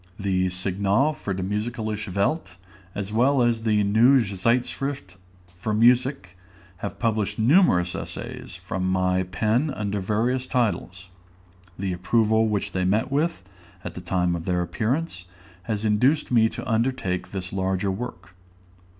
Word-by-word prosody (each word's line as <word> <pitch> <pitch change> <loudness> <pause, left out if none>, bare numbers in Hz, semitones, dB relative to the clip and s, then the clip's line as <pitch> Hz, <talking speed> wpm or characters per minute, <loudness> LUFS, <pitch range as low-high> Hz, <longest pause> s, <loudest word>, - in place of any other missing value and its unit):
The 95 -2 +1
"Signale 100 +9 +1
für 100 -8 -4
die 95 - -2
musikalische 105 0 -3
Welt," 100 - -1 0.4
as 100 0 -4
well 130 +3 +3
as 120 -1 +1
the 105 -2 +2
"Neue 120 +6 +5
Zeitschrift 115 +2 -2 0.5
für 105 +1 -1
Musik," 125 -4 +3 0.4
have 100 +2 -6
published 110 -3 -1
numerous 110 - +4
essays - - -7
from 95 -1 -3
my 90 0 +2
pen 110 +10 0
under 105 -6 -2
various 115 +6 0
titles. 95 -6 -1 0.7
The 95 -1 -2
approval 110 +5 +2
which 105 -2 -1
they 95 - -1
met 105 +8 +1
with, 150 - 0 0.4
at - - -6
the - - -7
time 90 -2 0
of 85 -1 -6
their 90 -1 +1
appearance, 110 - -2 0.4
has 110 0 -1
induced 125 +9 +2
me 115 -2 +4
to - - -7
undertake 115 -5 -1
this 95 -2 -5
larger 95 0 0
work. 95 -4 -7
105 Hz, 140 wpm, -24 LUFS, 95-120 Hz, 0.7 s, Neue